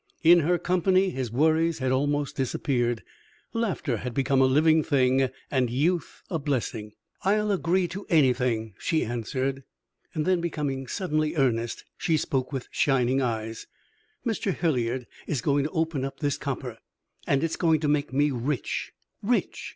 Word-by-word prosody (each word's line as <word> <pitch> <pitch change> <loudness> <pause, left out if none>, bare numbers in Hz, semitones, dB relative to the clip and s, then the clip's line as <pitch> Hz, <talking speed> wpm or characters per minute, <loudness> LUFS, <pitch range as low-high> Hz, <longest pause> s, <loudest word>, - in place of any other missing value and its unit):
In 170 +1 +8
her 175 +3 +2
company 185 +2 +2
his 130 -7 -3
worries 160 +5 +2
had 130 -1 -1
almost 145 +2 0
disappeared, 120 -3 0 0.5
laughter 195 - -1
had 120 +2 -5
become 135 0 +2
a - - +6
living 155 +4 +4
thing, 130 -1 +2 0.2
and 130 -3 +2
youth 160 +8 -1
a 165 - -2
blessing. 120 -7 -2 0.3
"I'll 210 +2 +2
agree 185 -1 +1
to 195 +3 -7
anything," 125 - +2
she 160 -3 0
answered; 130 +4 -2 0.5
then, 170 +3 +1
becoming 145 -6 -2
suddenly 155 -3 -1
earnest, 120 -5 0
she 165 -3 +2
spoke 130 -3 -1
with 135 -3 -4
shining 135 -1 +2
eyes: 115 -2 -3 0.6
"Mr. 220 -4 0
Hilliard 125 -6 0 0.2
is 145 - -1
going 140 +3 +1
to - - -1
open 160 -5 -1
up 135 - -5
this 145 -3 0
copper, 130 -4 -4 0.5
and 140 +2 +2
it 165 - 0
is - - -1
going 160 -3 +3
to 150 - 0
make 145 -2 +1
me 145 +2 +2
rich 130 +2 -2 0.3
rich! 235 +4 -1
140 Hz, 155 wpm, -26 LUFS, 130-165 Hz, 0.6 s, In